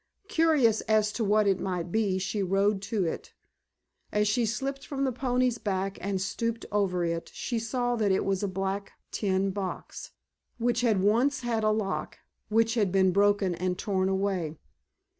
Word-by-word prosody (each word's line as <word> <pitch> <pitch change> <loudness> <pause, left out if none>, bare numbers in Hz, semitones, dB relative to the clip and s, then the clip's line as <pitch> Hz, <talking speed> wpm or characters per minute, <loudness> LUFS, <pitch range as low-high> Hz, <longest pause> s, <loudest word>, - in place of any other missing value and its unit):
Curious 315 - +3
as 215 -1 +3
to 235 - -1
what 210 +1 +3
it 195 -2 +2
might 180 -2 -3
be 205 -3 +1
she 190 +2 -2
rode 195 +1 +1
to 210 -5 +1
it. 165 - -5 0.8
As 210 0 +2
she 225 +2 +2
slipped 270 +5 -3
from 275 -1 -3
the 265 - +1
pony's 250 -1 0
back 195 -1 -2
and 195 -1 -1
stooped 230 +4 -2
over 190 -4 +1
it 165 0 -3
she 235 -3 -2
saw 245 +2 -1
that 210 -3 +2
it 190 - +1
was 195 -1 0
a 205 - 0
black 195 +1 -3 0.2
tin 195 -1 0
box, 190 -1 -5 0.5
which 240 0 +1
had 215 -6 +2
once 250 +7 +2
had 230 -3 -1
a 215 - +3
lock, 195 -8 -2 0.3
which 225 +1 +3
had 210 -6 +1
been 190 -1 +4
broken 200 -1 +3
and 180 +1 -2
torn 190 -2 0
away. 190 -5 -1
205 Hz, 175 wpm, -28 LUFS, 190-230 Hz, 0.8 s, been